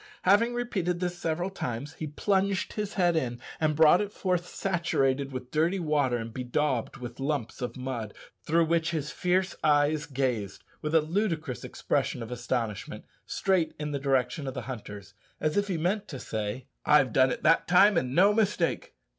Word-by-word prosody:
Having 230 +6 +4
repeated 190 -8 -1
this 180 -1 -2
several 175 +2 -2
times, 135 -5 -4
he 155 - -5
plunged 195 +5 0
his 210 -1 -4
head 175 -3 +3
in, 120 -6 -1 0.2
and 155 -1 +1
brought 160 +4 +6
it 205 -1 -3
forth 180 -3 -1
saturated 140 -9 0
with 130 -1 -7
dirty 165 +5 +2
water 150 -7 +1
and 115 -1 -6
bedaubed 130 0 -1
with 125 -1 -8
lumps 135 -5 -2
of 125 - -4
mud, 125 -5 -5 0.3
through 165 +2 +2
which 165 0 +1
his 150 -3 -3
fierce 185 +1 0
eyes 145 0 +3
gazed, 125 -8 -2 0.2
with 150 +1 -1
a 160 - +6
ludicrous 160 - -2
expression 120 - -1
of 115 - -9
astonishment, 120 -4 -3 0.2
straight 185 -4 +1
in 150 0 -4
the 140 - -2
direction 135 +1 0
of 130 - -4
the - - -4
hunters, 105 -6 -8 0.3
as 155 -1 0
if 205 0 +1
he 185 -4 -1
meant 185 +6 -1
to 140 - -6
say, 110 +1 -4 0.2
"I've 135 -6 +4
done 130 0 +5
it - - -4
that 165 +1 +4
time, 195 +4 +6
and 130 -5 0
no 200 +4 +6
mistake!" 205 -5 0
150 Hz, 180 wpm, -28 LUFS, 130-180 Hz, 0.3 s, brought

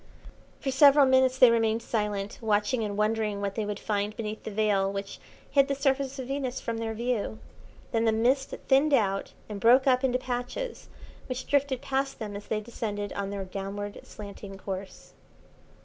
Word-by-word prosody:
For 270 - -2
several 280 +1 +7
minutes 260 0 +4
they 250 -2 +8
remained 225 0 +1
silent, 210 -3 -2
watching 220 +2 +1
and 205 -1 -3
wondering 215 -1 0
what 200 -1 -2
they 215 -1 -2
would 210 -1 -3
find 210 0 -2
beneath 215 -1 -4
the - - -6
veil 200 -2 +1
which 195 0 -5 0.3
hid 275 -1 +5
the 280 - 0
surface 275 0 0
of 260 - -4
Venus 265 -2 -2
from 230 -1 -3
their 225 -1 -3
view. 230 - -2 0.5
Then 225 0 +1
the 225 - +4
mist 250 +5 +1
thinned 280 +2 +5
out 195 -5 0
and 210 -2 -6
broke 245 +5 +6
up 255 -1 +3
into 255 -1 +2
patches 250 - -4 0.4
which 255 0 -4
drifted 280 -3 +1
past 270 0 -1
them 210 -2 -6
as 200 - -8
they 215 -1 -1
descended 205 -2 -4
on 200 -1 -3
their 200 -1 -4
downward 200 +2 -5
slanting 200 -1 -9
course. 195 0 -7
225 Hz, 180 wpm, -28 LUFS, 205-260 Hz, 0.5 s, they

